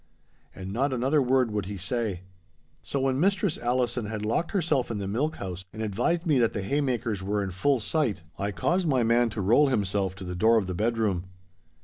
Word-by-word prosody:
And 95 0 -6
not 135 +4 +1
another 135 +4 +2
word 130 -2 +2
would 105 -3 -2
he 100 0 -5
say. 100 -1 -2 0.6
So 140 - -3
when 135 0 +1
Mistress 195 0 +1
Allison 120 -2 0
had 105 0 -4
locked 115 +10 0
herself 160 - 0
in 115 - -3
the 100 -1 -3
milk 140 +10 -1
house, 90 -2 -6
and 110 +1 -5
advised 125 - 0
me 150 -6 +3
that 115 -2 +2
the 100 - -3
haymakers 120 -5 -1
were 100 +1 -1
in 95 - -4
full 130 +9 +1
sight, 110 - 0 0.2
I 100 - -1
caused 175 - 0
my 130 -5 +2
man 115 +1 +3
to 105 -1 -4
roll 120 +10 +4
himself 100 -6 0
to 95 - -9
the 90 -1 -5
door 110 +6 +4
of 105 - +1
the 95 - -4
bedroom. 105 -3 0
115 Hz, 210 wpm, -27 LUFS, 100-135 Hz, 0.6 s, roll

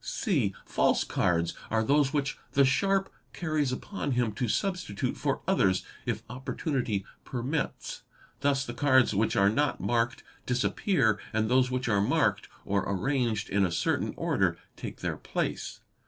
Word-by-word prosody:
(c) 135 - 0
False - - +2
cards 85 -1 +1 0.2
are 110 0 +2
those 140 +3 +3
which 140 -2 -1
the 140 0 +5
sharp 195 +8 +2 0.2
carries 155 -5 0
upon 145 +1 -3
him 120 -3 +1
to 120 +4 -2
substitute 180 - -1
for - - -1
others 95 -1 +2 0.2
if - - -1
opportunity 125 - -2 0.2
permits; 135 +4 -3 0.4
thus 135 -1 +1
the 120 - -5
cards 130 -3 +4
which 105 +3 +1
are 100 - +5
not 145 +4 +1
marked 120 0 0 0.2
disappear 125 - +2
and 110 +1 +1
those 130 0 +4
which 125 -1 -2
are 100 -3 +3
marked 100 - +1 0.2
or 100 0 +1
arranged 115 +1 0
in 100 0 +2
a 90 - +1
certain 85 - 0
order - - +1 0.2
take - - -7
their - - -2
place. - - -3
125 Hz, 150 wpm, -29 LUFS, 110-145 Hz, 0.4 s, the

